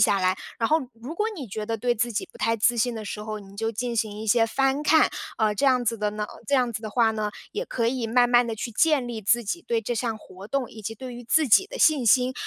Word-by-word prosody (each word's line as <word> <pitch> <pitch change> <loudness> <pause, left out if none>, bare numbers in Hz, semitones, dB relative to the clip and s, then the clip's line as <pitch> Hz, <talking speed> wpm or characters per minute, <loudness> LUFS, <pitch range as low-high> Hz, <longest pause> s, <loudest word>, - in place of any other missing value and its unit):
下 205 -1 +4
来。 185 0 +2 0.2
然 230 - +1
后 315 - +4 0.2
如 240 +7 -8
果 420 +5 0
你 275 -6 -6
觉 210 +1 -5
得 225 0 -1
对 240 +2 0
自 235 +1 -1
己 210 - -3
不 - - -15
太 230 0 +1
自 235 +2 +2
信 240 +1 +1
的 220 -1 -6
时 210 +1 -5
候， 215 0 -5
你 200 -1 -14
就 225 +2 -2
进 240 +2 -3
行 220 -2 -1
一 220 - -6
些 225 +1 +4
翻 270 +4 +1
看。 315 +1 +4 0.3
呃， 215 -1 +1
这 275 - +1
样 255 -2 +3
子 230 -1 -1
的 210 0 0
呢 210 0 -3
呃， - - -11
这 280 - +1
样 250 -3 +2
子 215 - -4
的 220 - -5
话 225 0 +3
呢， 215 -1 -2 0.2
也 460 +4 -3
可 230 - -1
以 245 -1 -1
慢 245 +2 +3
慢 240 0 +5
地 225 - -3
去 235 +2 -4
建 290 +2 +2
立 235 -2 -5
自 235 +4 +2
己 345 +12 -3
对 230 -1 -1
这 240 +3 -2
项 230 -1 -2
活 195 -2 -12
动， 275 -4 -2
以 220 - -11
及 220 +2 -5
对 255 +2 -8
于 245 - -9
自 310 +5 +3
己 380 - +6
的 - - -8
信 295 - +4
心。 250 +3 +4
230 Hz, 315 characters per minute, -25 LUFS, 215-255 Hz, 0.3 s, 己